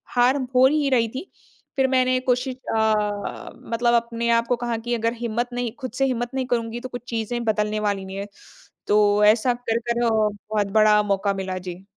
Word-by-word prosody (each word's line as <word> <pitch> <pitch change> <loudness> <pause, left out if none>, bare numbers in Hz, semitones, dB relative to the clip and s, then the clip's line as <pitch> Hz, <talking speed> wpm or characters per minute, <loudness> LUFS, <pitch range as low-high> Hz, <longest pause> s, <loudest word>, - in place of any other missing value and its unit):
हार 245 +2 +4 0.2
हो 255 +1 +7
ही 295 -1 +1
रही 235 -3 +2
थी। 350 - -6 0.5
फिर 265 -1 +2
मैंने 255 -1 +2
कोशिश 250 +1 +1 0.2
अ, 210 -2 -1 0.2
मतलब 235 +1 +2
अपने 235 0 0
आप 230 0 +2
को 245 - +2
कहा 235 -1 -1
कि 240 +2 -4
अगर 230 +1 0
हिम्मत 240 +1 -3
नहीं 245 -2 -2
खुद 255 -4 -5
से 270 - +4
हिम्मत 240 -1 -2
नहीं 260 -1 -1
करुँगी 230 0 -4
तो 255 +1 -7
कुछ 245 -2 -7
चीज़ें 235 +1 -2
बदलने 215 0 0
वाली 200 -2 -1
नहीं 190 +1 -7
है। 200 +1 -5 0.6
तो 210 0 +4
ऐसा 230 +4 +4
कर-कर 235 0 -2
अ, - - +3
बहुत 210 -1 0
बड़ा 210 0 +5
मौका 200 0 0
मिला। 190 -1 -4
जी। 180 +2 -9
230 Hz, 195 wpm, -23 LUFS, 210-245 Hz, 0.6 s, हो